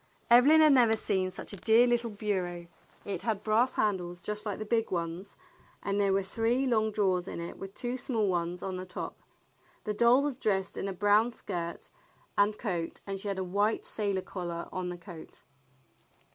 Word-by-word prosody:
Evelyn 280 +7 +8
had 305 -2 +7
never 235 -4 +5
seen 190 -4 0
such 185 - -8
a - - -6
dear 225 +6 +5
little 240 -1 +1
bureau. 185 -5 -3 0.4
It 195 -4 -3
had 215 -3 -2
brass 230 +4 +2
handles 180 -4 -1
just 210 +4 -5
like 205 - -2
the 215 - -5
big 225 +1 +1
ones, 170 +2 -4 0.5
and 200 0 0
there 200 -1 +3
were 195 0 +2
three 230 +6 0
long 220 -4 +2
drawers 190 -3 +1
in - - -5
it 170 0 -7
with 195 0 -8
two 245 +1 -3
small 240 -5 0
ones 175 -1 -1
on 190 -1 -3
the 185 - -5
top. - - -6 0.7
The 210 - -2
doll 235 +5 +5
was 285 -4 -2
dressed 195 -6 0
in - - -3
a - - -2
brown 205 +4 +3
skirt 170 -7 -6 0.4
and 205 +1 +3
coat, 175 -7 -3
and 195 -1 -4
she 205 - -6
had 200 -1 -2
a 190 - -1
white 205 +4 0
sailor 200 -3 -2
collar 175 -2 -5
on 185 -1 -3
the 175 - -5
coat. 170 -2 -12
205 Hz, 195 wpm, -30 LUFS, 185-225 Hz, 0.7 s, Evelyn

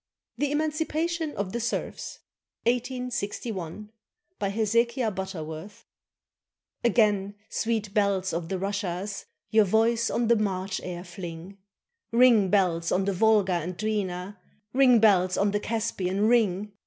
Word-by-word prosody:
THE 290 -1 -1
EMANCIPATION 315 +1 -1
OF 200 -2 -2
THE 235 - -2
SERFS 235 - -4 0.4
BY 250 +1 0 1.4
HEZEKIAH 230 +3 +1
BUTTERWORTH 185 -1 -7 1.0
Again, 210 -4 +2 0.2
sweet 220 -3 -1
bells 195 -4 +1
of 165 0 -3
the 190 - -1
Russias, 200 0 -3 0.2
Your 220 -1 +5
voice 225 +3 +2
on 235 -1 0
the 235 - +5
March 195 -3 -2
air 175 -1 -5
fling! 175 +1 -9 0.5
Ring, 230 -5 +5
bells, 175 -4 +2
on 190 +1 +2
the 200 - 0
Volga 205 -1 +3
and 175 +1 -3
Dwina, 200 -3 -2 0.4
Ring, 255 -2 +6
bells, 185 -4 +4
on 200 0 +2
the 205 - 0
Caspian, 205 -4 -2
ring! 210 -4 +2
205 Hz, 120 wpm, -27 LUFS, 185-230 Hz, 1.4 s, Ring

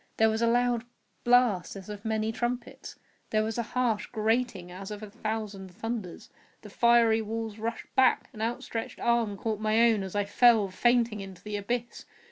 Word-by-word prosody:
There 220 0 +5
was 220 +1 -1
a 235 - +3
loud 240 0 +2 0.4
blast 240 -8 +3
as 195 -1 -9
of 210 -1 -8
many 220 0 -1
trumpets! 240 +1 -4 0.3
There 215 0 +2
was 220 +2 -3
a 235 +2 -5
harsh 225 -4 +1
grating 220 -5 -1
as 190 +2 -8
of 210 0 -7
a 210 - -8
thousand 210 -3 -4
thunders! 210 -1 -6 0.3
The 210 - -11
fiery 235 -1 +4
walls 220 0 -5
rushed 230 +1 -5
back! 260 -1 +4
An 215 - -8
outstretched 230 0 -3
arm 235 -4 +1
caught 215 0 -2
my 215 +1 +2
own 215 -3 0
as 190 0 -6
I 205 -1 +1
fell, 220 -1 +4
fainting, 235 +2 +2
into 190 -2 -9
the 210 0 -5
abyss. 235 +4 -3
220 Hz, 180 wpm, -28 LUFS, 205-235 Hz, 0.4 s, There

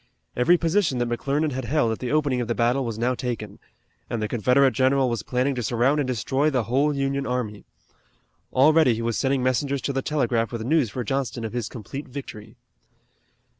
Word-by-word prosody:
Every 150 +9 +4
position 165 -4 +1
that 120 0 0
McClernand 140 +6 -1
had 130 -1 -4
held 125 -2 +1
at 110 - -3
the 125 - -3
opening 145 -4 +1
of 120 - -3
the 120 - -1
battle 125 +3 +1
was 115 -3 -4
now 120 +3 +1
taken, 115 -5 -5 0.5
and 120 - -2
the 105 - -1
Confederate 125 +5 +3
general 130 +1 +2
was 115 - -2
planning 130 +2 0
to 125 - -3
surround 120 +6 +1
and 140 - 0
destroy 130 +4 0
the 130 -5 0
whole 135 +6 +1
Union 140 0 -1
army. 115 -5 -3 0.9
Already 145 -2 +5
he 115 - -4
was 115 -1 -1
sending 135 -1 0
messengers 135 +2 0
to 140 - -1
the 135 - -1
telegraph 120 -6 0
with 115 -2 -4
news 145 -3 +2
for 125 +4 -4
Johnston 120 -2 -2
of 110 - -6
his 120 -3 -3
complete 130 +5 -7
victory. 115 -5 -9
125 Hz, 200 wpm, -24 LUFS, 120-140 Hz, 0.9 s, Already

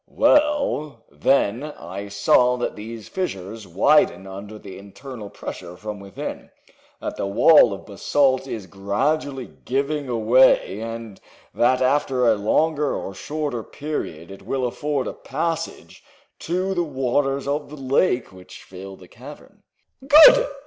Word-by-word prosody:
"Well, 280 - +1
then, 100 - +1
I 100 -9 -7
saw 125 +5 +3
that 120 - -3
these 110 +1 -8
fissures 105 - -5
widen 95 - +3
under 100 +2 -9
the 100 -3 -11
internal 105 +2 -10
pressure 90 -2 -8
from 105 0 -7
within, 100 0 -7 0.5
that - - -5
the - - -2
wall 120 +5 +6
of 100 - -7
basalt 130 +6 +1
is 110 -6 -6
gradually 130 - -2 0.2
giving 135 -4 -2
way 125 -4 +4
and 115 -3 -7 0.3
that 125 +2 +2
after 130 -1 +1
a 115 - +5
longer 150 +8 +1
or 95 - -5
shorter 145 +1 -4
period 100 - -6
it 95 - -11
will 130 -2 -2
afford 140 +2 -2
a - - -4
passage 165 +3 -5 0.4
to 185 +3 -2
the 175 -2 0
waters 135 -1 -1
of 145 +1 -2
the 150 - -10
lake 130 - +1
which 95 0 -13
fill 95 +1 -10
the 90 -1 -16
cavern." 135 +9 -14 0.5
"Good!" - - +8
125 Hz, 135 wpm, -22 LUFS, 100-145 Hz, 0.5 s, Good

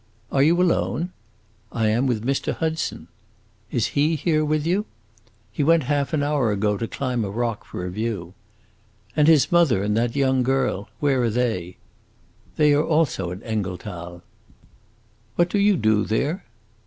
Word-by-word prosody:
"Are 135 - +2
you 165 +5 +4
alone?" 175 -2 +1 0.6
"I 110 -2 +1
am 120 +5 +1
with 115 -3 -1
Mr. 135 +1 -1
Hudson." 160 - -3 0.6
"Is 120 - 0
he 150 +3 +2
here 155 0 +1
with 155 0 0
you?" 190 +5 0 0.6
"He 145 - -1
went 165 +1 +4
half 140 +1 0
an 150 -3 0
hour 145 -6 +1
ago 105 0 +1
to 115 +3 -3
climb 125 -3 -2
a 100 - -3
rock 115 +1 -2
for 90 - -6
a 90 - -4
view." 100 -4 -4 0.8
"And 150 -1 +4
his 160 -4 +5
mother 160 - +3
and 105 +1 0
that 115 +1 0
young 130 -2 +2
girl, 130 -6 0
where 135 -3 +2
are 120 - +2
they?" 110 -7 -2 0.8
"They 150 -1 +4
also 150 - +1
are - - -4
at 95 - -10
Engelthal." 90 -5 -5 1.1
"What 175 +4 +2
do 205 - +1
you 205 -1 +4
do 110 -1 +2
there?" 145 - -1
130 Hz, 165 wpm, -23 LUFS, 110-155 Hz, 1.1 s, his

